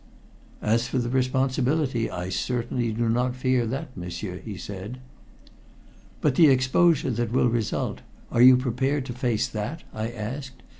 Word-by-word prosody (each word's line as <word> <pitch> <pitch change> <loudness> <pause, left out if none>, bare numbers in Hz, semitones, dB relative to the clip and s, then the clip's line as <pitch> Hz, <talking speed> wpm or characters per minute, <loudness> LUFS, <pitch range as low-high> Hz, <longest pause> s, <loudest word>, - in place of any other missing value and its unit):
"As 115 +2 +2
for 130 - -2
the 120 -1 -1
responsibility, 130 0 +1
I 90 +1 -4
certainly 120 +3 -1
do 115 +2 -1
not 125 +2 +1
fear 130 -2 +1
that, 135 +3 -5
m'sieur," 90 +1 -5
he 105 -4 -7
said. 100 +6 -7 1.2
"But 150 - +3
the 160 +3 +6
exposure 135 +3 +3
that 115 -1 -1
will 125 0 +3
result 115 -2 -2 0.3
are 115 - +2
you 130 0 +9
prepared 130 +2 -1
to 125 - -5
face 120 -3 0
that?" 110 +10 -4
I 110 +1 -3
asked. 125 +4 -6
125 Hz, 150 wpm, -25 LUFS, 115-130 Hz, 1.2 s, you